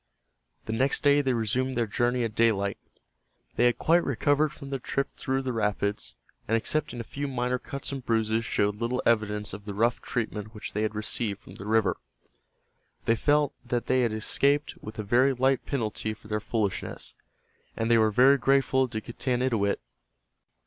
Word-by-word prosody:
The 110 - -3
next 130 +4 +1
day 145 0 +5
they 130 -3 +1
resumed 125 +4 0
their 120 -1 +1
journey 120 +3 0
at 115 -2 -2
daylight. 100 -4 +1 0.8
They 120 - +3
had 120 - +3
quite 170 +2 +3
recovered 145 +3 +2
from 140 -2 -10
their 135 - -2
trip 135 +2 -2
through 135 0 -1
the 130 -1 -2
rapids, 105 -2 -1 0.3
and 115 - +3
excepting 125 +1 -2
a - - -3
few 145 +5 -4
minor 125 -1 -1
cuts 140 +3 -5
and 135 -2 -5
bruises 110 -1 +1
showed 105 -3 0
little 120 +3 -1
evidence 105 -3 +1
of 100 +1 -8
the 100 -2 -5
rough 115 +3 +1
treatment 110 -2 -4
which 105 - -7
they 105 - -1
had 110 -1 -1
received 105 -1 -1
from - - -13
the 100 - -9
river. 110 -2 +2 1.1
They 115 - +3
felt 145 +3 +2
that 120 -1 -2
they 130 0 +2
had 120 -2 +1
escaped 140 +7 +1
with 110 - -9
a 110 - -3
very 125 +6 +3
light 130 +1 +1
penalty 110 -4 -2
for 105 - -17
their 105 0 -1
foolishness, 105 -2 -3 0.6
and 115 +1 0
they 115 - +6
were 110 0 +4
very 130 +6 +5
grateful 130 0 +3
to 110 -3 -4
Getanittowit. 120 -3 0
120 Hz, 180 wpm, -27 LUFS, 110-130 Hz, 1.1 s, they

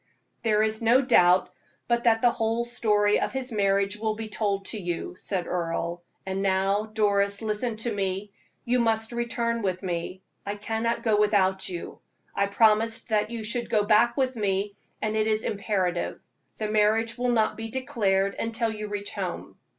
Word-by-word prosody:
"There 215 -2 +2
is 220 0 0
no 240 +4 +4
doubt 180 -5 +4 0.4
but 235 0 0
that 225 -1 +4
the 245 - +5
whole 225 +1 -1
story 210 -3 +2
of - - -2
his 265 -1 -3
marriage 200 -1 +1
will 215 0 -1
be 220 0 -6
told 200 -2 -1
to 220 - -3
you," 175 -2 -4
said 185 -3 -2
Earle. 170 0 -3 0.2
"And 190 0 -2
now, 195 +2 +1
Doris, 200 -1 +1
listen 220 +2 -1
to 225 +1 -1
me 195 0 -2 0.3
you 245 +1 +2
must 225 -1 +1
return 235 -1 -1
with 185 -2 -2
me; 180 +1 -4 0.2
I 200 +1 -4
cannot 225 +3 -2
go 215 -3 +2
without 190 -2 +2
you. 175 -2 -7 0.3
I 200 - +1
promised 225 +3 +2
that 210 -1 +1
you 230 -1 -5
should 230 +1 -1
go 215 -3 +2
back 230 +3 +4
with 260 -1 +1
me, 200 -1 -1 0.3
and 215 0 -1
it 215 0 +1
is 215 0 +1
imperative. 190 -4 -1 0.4
The 215 -1 -3
marriage 220 +2 +2
will 245 0 -1
not 225 -3 +2
be 225 0 -6
declared 200 -6 0
until 230 0 -1
you 215 -1 -5
reach 205 0 -4
home." - - -5
215 Hz, 175 wpm, -26 LUFS, 200-230 Hz, 0.4 s, the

